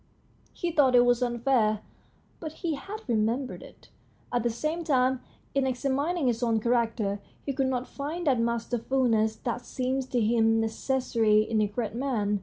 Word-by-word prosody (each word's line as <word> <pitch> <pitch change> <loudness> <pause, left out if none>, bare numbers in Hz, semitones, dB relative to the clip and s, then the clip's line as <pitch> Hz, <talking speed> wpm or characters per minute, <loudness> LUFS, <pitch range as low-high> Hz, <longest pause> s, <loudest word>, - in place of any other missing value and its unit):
He 345 - -3
thought 275 -5 +4
it 245 0 +7
was 245 0 +3
unfair, 240 -3 +1 0.6
but 315 -2 -6
he 330 - +1
had 395 +8 -7
remembered 235 +3 0
it. - - -15 0.4
At 245 - +2
the 240 - +1
same 305 +9 -2
time, 260 -4 +2 0.3
in 275 -1 +2
examin 275 +6 0
ing 315 - 0
his 240 -1 +1
own 230 -2 +2
character, 225 -3 0 0.3
he 275 - -1
could 270 0 +1
not 255 -1 -1
find 310 +5 -5
that 265 -5 +3
masterfulness 230 -1 +1
that 245 0 -2
seemed 260 +1 -2
to 245 - +1
him 225 0 +3
necessary 225 -2 +2
in 220 0 0
a 210 - +2
great 210 +1 -3
man. 225 -5 0
245 Hz, 170 wpm, -28 LUFS, 225-270 Hz, 0.6 s, it